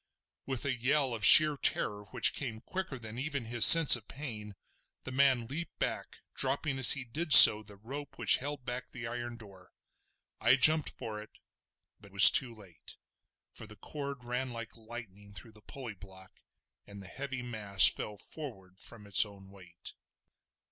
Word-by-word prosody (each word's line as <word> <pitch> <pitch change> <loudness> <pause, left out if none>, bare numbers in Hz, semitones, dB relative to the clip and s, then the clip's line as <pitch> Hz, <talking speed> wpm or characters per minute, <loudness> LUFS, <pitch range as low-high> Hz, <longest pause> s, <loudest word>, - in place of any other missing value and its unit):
With 130 -1 -8
a 135 -2 -5
yell 130 +2 -4
of 110 -2 -10
sheer 155 +6 +5
terror 105 -5 -6
which - - -1
came 120 -6 -10
quicker 185 0 -10
than 115 0 -12
even 140 -3 -8
his 120 0 +3
sense 165 -5 +9
of 110 -3 -14
pain, 110 -8 -12 0.5
the 130 - -12
man 130 -3 -3
leaped 155 +7 -11
back, - - -9
dropping 135 +1 -7
as 130 - +6
he 140 -3 -9
did 155 +7 -9
so 105 -5 +10
the 105 -1 -18
rope 135 +8 -14
which - - 0
held 145 -1 -11
back 125 +1 -10
the 125 -1 -12
iron 120 0 -10
door. 95 -5 -20 0.7
I 120 +3 -1
jumped 155 +3 +2
for 110 -4 -12
it, 105 - -18 0.7
but 100 - -22
was 100 0 +6
too 130 -3 -6
late, 90 -8 -17 0.6
for 110 - -14
the 105 - -16
cord 140 - -12
ran 125 +2 -8
like 115 -2 -13
lightning 110 -3 -15
through 105 +5 -15
the 105 0 -21
pulley 130 -2 -13
block, 95 -1 -19 0.6
and 100 0 -16
the 95 - -14
heavy 135 0 -11
mass 105 -5 0
fell 105 -1 -4
forward 95 -10 -14
from 110 -2 -15
its 100 -2 +4
own 100 -2 -16
weight. 90 -3 -14
120 Hz, 175 wpm, -26 LUFS, 105-135 Hz, 0.7 s, so